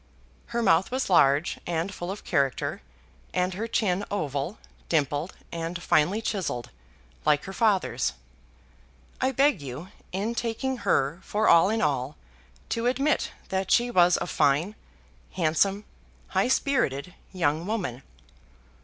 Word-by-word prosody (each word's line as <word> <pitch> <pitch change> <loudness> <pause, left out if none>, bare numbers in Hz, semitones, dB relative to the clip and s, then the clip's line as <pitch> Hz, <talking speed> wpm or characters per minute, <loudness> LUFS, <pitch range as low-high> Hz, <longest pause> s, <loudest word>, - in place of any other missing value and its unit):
Her 235 0 -1
mouth 165 -2 +4
was 255 -5 -2
large, 145 -1 +4
and 170 +3 -1
full 175 -1 -5
of 200 +2 -6
character, 140 -6 0 0.5
and 180 +1 +1
her 215 +5 -3
chin 200 -4 0
oval, 155 0 -2 0.3
dimpled, 150 +1 0 0.2
and 170 +1 -4
finely 175 +6 +2
chiselled, 185 - -3 0.5
like 150 -1 +3
her 195 - -7
father's. 190 - +1 1.1
I 260 +1 +2
beg 270 - +3
you, 140 +6 -7 0.2
in 205 +5 -2
taking 240 +3 -2
her 165 - +1
for 215 +2 0
all 170 +3 +6
in 220 -2 0
all, 140 -1 -1 0.5
to 230 +1 0
admit 275 +4 +1 0.2
that 190 -1 -1
she 245 0 +3
was 175 -4 +5
a - - -2
fine, 155 +4 +2 0.6
handsome, 190 +5 +1 0.4
high - - +2
spirited 180 - 0 0.2
young 165 -2 0
woman. 180 - -3
180 Hz, 130 wpm, -26 LUFS, 150-220 Hz, 1.1 s, all